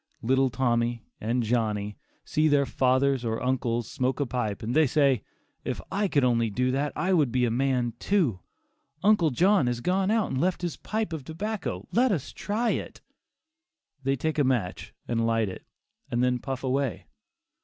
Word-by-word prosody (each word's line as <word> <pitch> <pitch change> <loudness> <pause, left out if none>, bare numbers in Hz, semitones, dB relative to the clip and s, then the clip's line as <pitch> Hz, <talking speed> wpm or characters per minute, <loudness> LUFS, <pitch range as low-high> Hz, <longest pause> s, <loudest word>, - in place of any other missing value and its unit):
Little 130 +2 +3
Tommy 120 -1 0
and 120 +3 0
Johnny 105 -3 -1 0.3
see 155 +1 +2
their 145 -2 +3
fathers 130 0 +2
or 115 -1 -1
uncles 120 -2 -1
smoke 130 +2 -1
a 145 - +1
pipe 115 -5 -3
and 115 +3 -2
they 155 +1 +5
say, 135 -4 +3 0.4
"If - - -3
I 200 +1 +1
could 145 -7 +2
only 115 -2 +2
do 125 +5 0
that 140 +3 0
I 190 +1 +1
would 150 -8 +3
be 125 0 +2
a 115 - 0
man 125 -1 +1
too; 165 - +1 0.6
uncle 205 -6 +4
John 175 +2 +3
has 120 -1 -1
gone 185 +8 +1
out 220 -1 +1
and 130 - -1
left 180 +1 0
his 175 - -2
pipe 220 -5 -3
of 155 -4 -4
tobacco, 165 - -4
let 250 +1 +3
us 160 -9 -2
try 220 +3 -1
it." - - -4 1.0
They 135 0 +1
take 155 +3 -2
a - - +5
match 120 -9 -1 0.2
and 115 -1 0
light 115 -2 +1
it, 95 - -10 0.4
and 120 +1 0
then 125 0 +2
puff 135 +1 -5
away. 135 -1 -1
130 Hz, 180 wpm, -27 LUFS, 120-160 Hz, 1.0 s, they